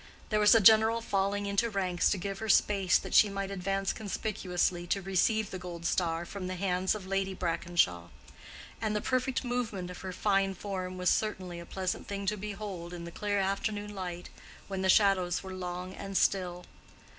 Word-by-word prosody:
There 215 - +2
was 210 +1 +7
a - - +7
general 220 +2 +6
falling 200 -2 0
into 200 +3 +1
ranks 185 -4 +1
to 205 - +1
give 195 +1 -4
her 220 - -4
space 195 -3 +4
that - - -7
she 210 - +7
might 195 0 -4
advance 195 +1 -1
conspicuously 180 -4 -2
to 195 - +1
receive 195 +3 +1
the 185 - -5
gold 175 -2 -7
star 170 -1 0
from 190 0 -6
the 185 - -3
hands 185 +1 0
of 205 -3 -7
Lady 195 0 -1
Brackenshaw; 165 - 0 0.7
and 215 -1 0
the - - +2
perfect 255 +1 0
movement 220 -7 -3
of 180 - -9
her 190 - -5
fine 195 +1 +1
form 185 -1 -5
was 180 -1 +2
certainly 185 -5 -2
a 170 - -10
pleasant 185 -1 -3
thing 200 0 -4
to 210 +2 +1
behold 195 -4 -6
in 170 - -7
the 170 - -7
clear 205 +3 -1
afternoon 205 +2 -1
light 180 -3 -6 0.4
when 195 -1 -3
the 190 - +1
shadows 185 -3 +3
were 190 0 -7
long 180 0 -5
and 195 -1 -4
still. 180 -2 +1
195 Hz, 190 wpm, -30 LUFS, 180-205 Hz, 0.7 s, was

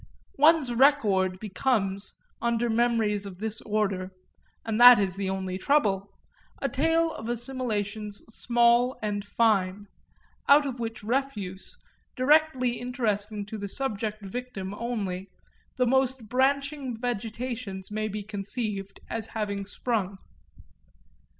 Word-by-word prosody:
One's 300 -4 +5
record 210 -9 +3
becomes, 200 -1 -1 0.3
under 235 0 +1
memories 220 -3 +1
of 185 -2 -9
this 220 +2 -4
order 200 -4 -1 0.6
and 225 +1 0
that 245 0 +11
is 195 -3 +1
the 195 -1 -2
only 190 -1 -3
trouble 200 -8 +2 0.5
a 275 - 0
tale 325 +5 +2
of 220 +1 -6
assimilations 220 -4 -2
small 240 +2 +3
and 205 -1 -1
fine; 205 -2 +1 0.6
out 285 +1 +7
of 260 -3 -4
which 225 -2 -5
refuse, 215 -6 -3 0.4
directly 260 -3 +3
interesting 215 -4 -2
to 215 +1 -7
the 200 0 -5
subject 215 -4 -2
victim 195 -3 -5
only, 200 -5 -3 0.5
the 250 - +3
most 260 -2 +1
branching 275 0 0
vegetations 230 -3 -4
may 215 0 -1
be 210 0 -5
conceived 200 -1 -4
as 225 -1 -4
having 200 -2 -2
sprung. 200 -2 -2
220 Hz, 120 wpm, -27 LUFS, 200-250 Hz, 0.6 s, that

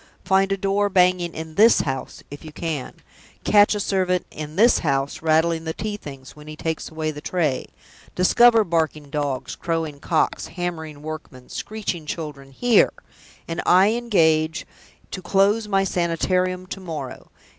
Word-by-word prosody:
Find 195 0 +2
a 195 - +1
door 200 +1 +1
banging 180 -2 +2
in 160 0 -7
this 220 +7 +5
house, 135 -2 -5
if 145 - -9
you 155 - -9
can! 150 -4 -4 0.5
Catch 205 0 +5
a - - -2
servant 185 -2 0
in 155 0 -7
this 230 +6 +5
house 140 -3 -1
rattling 160 +1 +2
the 160 0 -4
tea 215 -1 -3
things 135 -9 -11
when 150 0 -14
he 155 - -8
takes 160 0 -4
away 155 -1 -3
the 150 -1 -9
tray! 155 -7 -1 0.5
Discover 230 +5 +5
barking 160 -5 -1
dogs, 145 -4 -3
crowing 165 -4 -3
cocks, 160 +2 0
hammering 160 -5 -5
workmen, 155 -5 -8
screeching 190 -7 -5
children 150 -4 -6
here 235 - +3 0.5
and 165 0 -3
I 190 +4 +5
engage 160 -9 +1 0.5
to 185 - -5
close 200 +4 +2
My 195 -1 +2
Sanitarium 180 +1 0
to 195 - -5
morrow! 155 -8 -7
165 Hz, 155 wpm, -22 LUFS, 155-195 Hz, 0.5 s, this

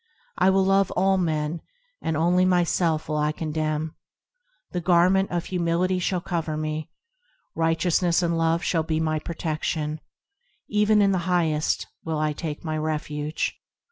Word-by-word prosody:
I - - +5
will 190 0 +3
love 195 0 +3
all 190 +1 +3
men, 160 -1 -1 0.4
and 160 -1 -1
only 175 +3 +3
myself 175 -3 +2
will 155 - -1
I 150 0 +1
condemn; 155 0 -2 0.8
The 180 - -2
Garment 185 +3 +4
of 175 -1 -2
Humility 180 +1 0
shall 180 0 -1
cover 165 -3 -2
me; 155 0 -3 0.6
Righteousness 165 +2 +2
and 170 -1 +1
Love 165 +1 +1
shall 165 - +1
be 160 0 -1
my 155 -1 0
protection; 155 -1 -3 0.7
Even 210 0 +3
in 200 - +3
the 185 -1 -1
Highest 160 -4 +1 0.2
will 160 -1 -2
I 150 0 0
take 150 -1 -5
my 155 -1 -2
refuge. 150 0 -2
165 Hz, 145 wpm, -25 LUFS, 155-180 Hz, 0.8 s, I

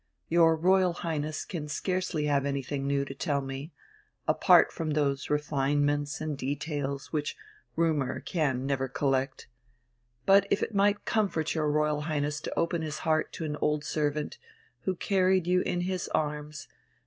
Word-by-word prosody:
Your 165 -1 +5
Royal 185 +2 +3
Highness 155 -3 -3
can 160 -5 -5
scarcely 180 0 -1
have 140 -2 +2
anything 140 0 -2
new 140 0 +1
to 135 - -7
tell 140 0 -1
me, 135 +3 -6 0.6
apart - - +5
from 160 -1 -3
those 140 -2 0
refinements 145 0 0
and 155 -1 -3
details 140 0 -3
which 150 -1 -2 0.4
rumour 160 -5 +1
can 140 -7 -1
never 135 -1 0
collect. 135 0 -1 0.8
But 195 0 +6
if - - +1
it - - -3
might 205 +1 +2
comfort 190 -8 0
your 155 -2 0
Royal 150 0 +1
Highness 150 -1 -1
to - - -5
open 170 0 0
his 155 -1 -4
heart 155 -1 +1
to 165 - -4
an 150 -1 -3
old 150 0 0
servant, 150 -1 -2 0.5
who 190 - 0
carried 185 -1 +2
you 180 +1 +3
in 175 -1 -1
his 185 0 -2
arms 150 0 -3
150 Hz, 155 wpm, -29 LUFS, 145-170 Hz, 0.8 s, But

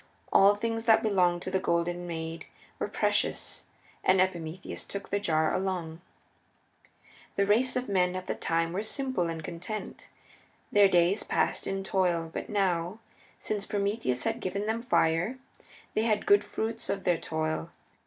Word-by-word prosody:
All 200 +1 +7
things 225 +2 -2
that 225 -1 +5
belonged 180 -5 +2
to 185 - -4
the 190 - +2
Golden 175 0 -1
Maid 165 -1 -5 0.3
were - - -1
precious, - - 0 0.4
and 185 0 +4
Epimetheus 175 -2 -2
took 200 0 -6
the 200 - 0
jar 160 -5 +1
along. 175 -4 -2 1.3
The 200 - +2
race 235 +6 +3
of 250 0 -1
men 185 -2 +2
at 185 0 -4
the - - -1
time 165 0 -1
were 195 - -1
simple 255 -4 -1
and 165 -1 -5
content. 180 +7 -6 0.6
Their 205 -1 +7
days 180 +2 +3
were - - -8
passed - - 0
in 195 0 -2
toil, 175 -4 0
but - - -5
now, 185 -2 0 0.4
since 210 -1 -3
Prometheus 200 - -1
had 225 +1 -1
given 200 0 -2
them 220 +2 -1
fire, 180 0 +2 0.6
they 215 - +1
had 220 -2 +1
good 405 0 +5
fruits 225 +1 -4
of 195 - -2
their 175 -2 +2
toil. 160 0 -2
190 Hz, 160 wpm, -29 LUFS, 170-210 Hz, 1.3 s, All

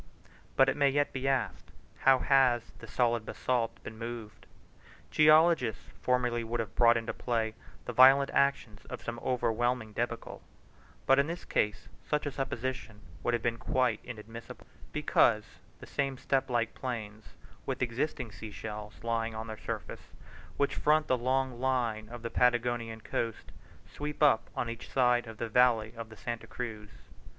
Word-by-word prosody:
But 135 - +6
it 135 - +1
may 140 -1 +4
yet 145 +1 +1
be 130 0 -2
asked, 135 -1 -1 0.3
how 135 -1 +6
has 130 -3 +3
the 115 - -10
solid 120 0 +1
basalt 120 +1 -2
been 110 0 -9
moved? 115 -2 -7 0.6
Geologists 155 - +4
formerly 125 -2 +1
would 115 +1 -3
have 110 -4 -3
brought 120 -1 +5
into 115 0 -3
play 115 -3 -1 0.3
the 125 - -4
violent 135 +3 +7
action 130 -7 +1
of - - -7
some 120 0 -5
overwhelming 120 -2 0
debacle; 115 +1 -4 0.6
but 135 +1 +5
in 140 - +3
this 170 +2 -5
case 105 0 -1 0.2
such 150 0 -1
a 145 - -2
supposition 130 -4 -4 0.2
would 120 - +1
have 120 - -4
been 115 -1 0
quite 130 +2 +1
inadmissible, 115 0 -9 0.3
because, - - +3 0.4
the - - -10
same 135 -1 -2
step 135 +1 0
like 120 -2 0
plains 110 -4 -6 0.3
with - - -1
existing 120 -1 -2
sea 110 +2 -8
shells 105 0 -8
lying 115 -1 -1
on 110 +1 -4
their 110 -1 -6
surface, - - -6 0.4
which 140 - +1
front 155 +1 +3
the 130 - +2
long 130 0 0
line 120 -5 0
of 120 -1 -9
the 115 - -4
Patagonian 120 -2 +1
coast, 115 0 -3 0.4
sweep 150 +1 -4
up 140 -7 +4
on 120 - -1
each 115 +1 -7
side 125 -2 +2
of 110 -1 -9
the 115 - -3
valley 115 -2 +3
of 115 -1 -8
Santa 120 0 -5
Cruz. 110 -4 -6
120 Hz, 160 wpm, -30 LUFS, 115-130 Hz, 0.6 s, violent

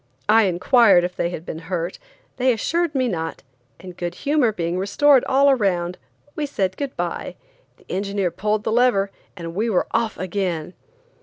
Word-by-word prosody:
I 220 0 +5
inquired 190 +1 +4
if 180 0 -3
they 170 - -1
had 170 -1 -7
been 160 - -6
hurt; 175 -1 -3 0.4
they 255 0 +3
assured 330 +7 -1
me 260 -1 +2
not, 165 -6 -4 0.4
and 180 -2 -10
good 175 0 -4
humor 285 -5 +1
being 175 -3 -2
restored 260 +8 +4
all 275 +1 +4
around, 180 -8 0 0.4
we 300 -1 -2
said 190 -8 -1
good 280 +2 -5
bye, - - -3 0.4
the - - -24
engineer 195 -1 -1
pulled 210 +4 -1
the - - -1
lever, 225 -5 +3 0.3
and 165 -1 -6
we 215 +6 -1
were 190 - +1
off 225 -2 0
again. 180 -3 -3
200 Hz, 170 wpm, -22 LUFS, 180-245 Hz, 0.4 s, I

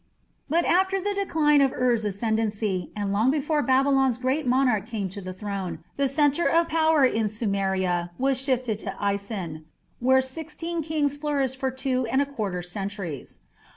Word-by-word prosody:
But 335 +4 +2
after 380 +2 +2
the 410 +2 -1
decline 315 -7 +3
of 270 -1 +3
Ur's 240 -3 +1
ascendancy, 210 -2 -1
and 200 -1 -2
long 220 +5 +3
before 300 +1 +1
Babylon's 270 -2 +3
great 260 +3 -1
monarch 245 -5 +2
came 210 -5 -3
to 200 +2 -8
the 185 0 -6
throne, 190 -3 -4 0.2
the 280 -1 +1
centre 290 +3 +2
of 335 0 +2
power 315 -3 +4
in 225 -4 +1
Sumeria 190 -5 -1
was 265 0 +1
shifted 255 -5 0
to 195 -3 -5
Isin, 200 -6 -3 0.3
where 260 +2 +4
sixteen 320 +5 -4
kings 295 -2 -1
flourished 280 -3 -1
for 265 0 -1
two 260 -1 -1
and 265 - +1
a 285 - +3
quarter 205 -10 -4
centuries. 190 - -6
255 Hz, 160 wpm, -25 LUFS, 200-285 Hz, 0.3 s, power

